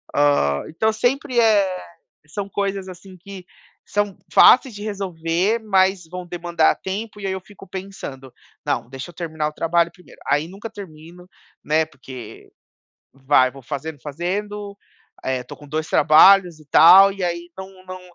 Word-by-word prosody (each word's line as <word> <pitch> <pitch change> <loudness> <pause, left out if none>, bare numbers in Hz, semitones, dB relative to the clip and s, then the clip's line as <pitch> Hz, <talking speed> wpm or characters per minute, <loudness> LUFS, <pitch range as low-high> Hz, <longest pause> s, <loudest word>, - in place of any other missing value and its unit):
Hã, 145 - +2
então 220 +7 0
sempre 250 +3 0
é 200 -5 +3 0.5
são 200 +6 -6
coisas, 195 -1 -3
assim, 185 +1 -12
que 190 0 -11 0.4
são 205 -2 -2 0.2
fáceis 255 -3 +6
de 205 - -9
resolver, 195 0 -1
mas 190 -3 +2
vão 180 0 -7
demandar 170 -2 +1
tempo, 210 +2 -5
e 195 - -4
aí 190 - -1
eu 190 - -4
fico 195 -1 -15
pensando: 180 -9 -8 0.3
"Não, - - -2
deixa 135 +5 -8
eu - - -19
terminar 160 -3 -3
o - - -8
trabalho 170 +1 +1
primeiro", 180 -3 -19
aí 150 +3 +1
nunca 200 +4 -9
termino, 180 -1 -12 0.4
né, 155 +1 +2
porque 130 -5 -12 0.6
vai 135 -1 +3
vou 135 - -13
fazendo 145 +2 -6
fazendo, 200 +7 -5 0.5
eh, 130 -1 -2
tô 125 - -11
com 145 - -15
2 155 +2 -3
trabalhos 170 +2 +5
e 155 - -18
tal, 185 +6 +8
e 195 -2 -6
aí 175 0 -3
não 190 -1 -11
não 185 0 -9
180 Hz, 160 wpm, -21 LUFS, 155-195 Hz, 0.6 s, tal